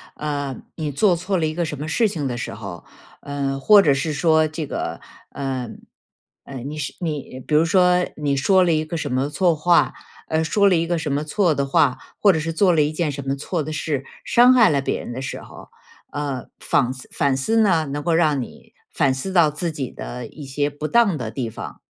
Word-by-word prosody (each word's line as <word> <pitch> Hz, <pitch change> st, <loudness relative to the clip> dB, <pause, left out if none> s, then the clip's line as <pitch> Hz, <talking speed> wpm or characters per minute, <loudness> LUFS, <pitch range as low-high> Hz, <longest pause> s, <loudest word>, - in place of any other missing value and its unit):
呃， 145 Hz, -3 st, -3 dB, 0.2 s
你 155 Hz, -3 st, -3 dB
做 180 Hz, +6 st, +3 dB
错 185 Hz, +3 st, -1 dB
了 165 Hz, -, +1 dB
一 155 Hz, -, -3 dB
个 170 Hz, +1 st, -1 dB
什 150 Hz, -2 st, -5 dB
么 150 Hz, -, -4 dB
事 220 Hz, +8 st, +2 dB
情 155 Hz, -8 st, -3 dB
的 120 Hz, -2 st, -3 dB
时 125 Hz, -, -5 dB
候， -, -, -8 dB, 0.4 s
呃， 140 Hz, -1 st, -3 dB
或 205 Hz, +8 st, +7 dB
者 150 Hz, -7 st, +4 dB
是 140 Hz, +3 st, -1 dB
说 160 Hz, +1 st, +3 dB
这 155 Hz, 0 st, -5 dB
个 -, -, -4 dB, 0.3 s
呃， 130 Hz, -3 st, -4 dB, 0.7 s
呃， 135 Hz, -, -9 dB
你 140 Hz, +5 st, -6 dB
是 150 Hz, -, -4 dB
你 150 Hz, -6 st, -4 dB
比 150 Hz, -, +1 dB
如 155 Hz, +2 st, +5 dB
说 180 Hz, 0 st, +3 dB
你 145 Hz, -2 st, 0 dB
说 190 Hz, +7 st, +4 dB
了 175 Hz, -, +2 dB
一 155 Hz, -1 st, +1 dB
个 165 Hz, +2 st, -4 dB
什 145 Hz, -4 st, -4 dB
么 130 Hz, +3 st, 0 dB
错 170 Hz, +2 st, +2 dB
话， 170 Hz, +3 st, +3 dB, 0.3 s
呃， 160 Hz, 0 st, 0 dB
说 200 Hz, +6 st, +3 dB
了 185 Hz, -, +3 dB
一 165 Hz, 0 st, +1 dB
个 170 Hz, 0 st, -1 dB
什 155 Hz, -3 st, -3 dB
么 145 Hz, +2 st, 0 dB
错 160 Hz, +1 st, +1 dB
的 140 Hz, -, 0 dB
话， 135 Hz, -1 st, +2 dB, 0.2 s
或 205 Hz, -, +6 dB
者 160 Hz, -, 0 dB
是 165 Hz, +2 st, -3 dB
做 185 Hz, +3 st, +3 dB
了 160 Hz, -, +3 dB
一 150 Hz, -, -1 dB
件 155 Hz, -1 st, -1 dB
什 140 Hz, -1 st, -7 dB
么 135 Hz, -, 0 dB
错 155 Hz, +4 st, -3 dB
的 155 Hz, +2 st, -5 dB
事， 150 Hz, -3 st, -2 dB, 0.2 s
伤 245 Hz, +2 st, +5 dB
害 240 Hz, -4 st, +6 dB
了 145 Hz, -, +2 dB
别 -, -, -2 dB
人 -, -, -7 dB
的 130 Hz, -, -5 dB
时 135 Hz, -, -5 dB
候。 -, -, -13 dB, 0.4 s
呃， 140 Hz, -4 st, -4 dB
仿 125 Hz, -3 st, +1 dB
思 130 Hz, -1 st, -10 dB
反 140 Hz, -2 st, +1 dB
思 220 Hz, +12 st, 0 dB
呢， 175 Hz, -7 st, +3 dB
能 145 Hz, +1 st, -4 dB
够 165 Hz, +2 st, +1 dB
让 155 Hz, -5 st, +2 dB
你 -, -, -11 dB, 0.2 s
反 135 Hz, -, +2 dB
思 130 Hz, +9 st, -4 dB
到 170 Hz, -5 st, +4 dB
自 165 Hz, +3 st, -3 dB
己 140 Hz, -5 st, -5 dB
的 125 Hz, 0 st, -7 dB
一 150 Hz, -, -11 dB
些 140 Hz, +1 st, -1 dB
不 145 Hz, +2 st, -5 dB
当 220 Hz, -4 st, +3 dB
的 115 Hz, -3 st, -4 dB
地 115 Hz, -1 st, -4 dB
方。 -, -, -9 dB
150 Hz, 250 characters per minute, -22 LUFS, 140-170 Hz, 0.7 s, 或